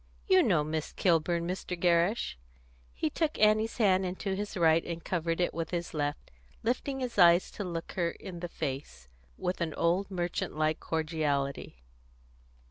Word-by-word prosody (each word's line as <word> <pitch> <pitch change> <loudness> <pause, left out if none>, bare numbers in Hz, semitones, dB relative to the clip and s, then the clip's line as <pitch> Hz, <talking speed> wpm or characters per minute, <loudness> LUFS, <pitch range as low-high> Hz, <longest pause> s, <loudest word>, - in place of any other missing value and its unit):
You 375 -1 +6
know 180 - +3
Miss 155 0 -3
Kilburn, 170 -1 +1
Mr. 180 -1 -4
Gerrish." 175 - +2 0.6
He 150 - -2
took 315 -2 -1
Annie's 215 +1 +3
hand 190 -5 +4
into 190 +2 -3
his 205 0 -4
right 165 -1 +4
and 170 -1 -5
covered 165 -1 -1
it 175 - +1
with 165 -1 -3
his 175 -1 -3
left, 145 -1 -3 0.3
lifting 265 +3 -1
his 245 -5 -3
eyes 175 0 +6
to 205 - -5
look 170 -3 -5
her 170 -2 0
in 180 0 -8
the 175 - -4
face 130 - -5 0.3
with 180 0 -2
an 160 -2 -1
old 180 +4 +1
merchant 175 -4 -3
like 155 0 +1
cordiality. 150 - -2
170 Hz, 160 wpm, -30 LUFS, 160-190 Hz, 0.6 s, You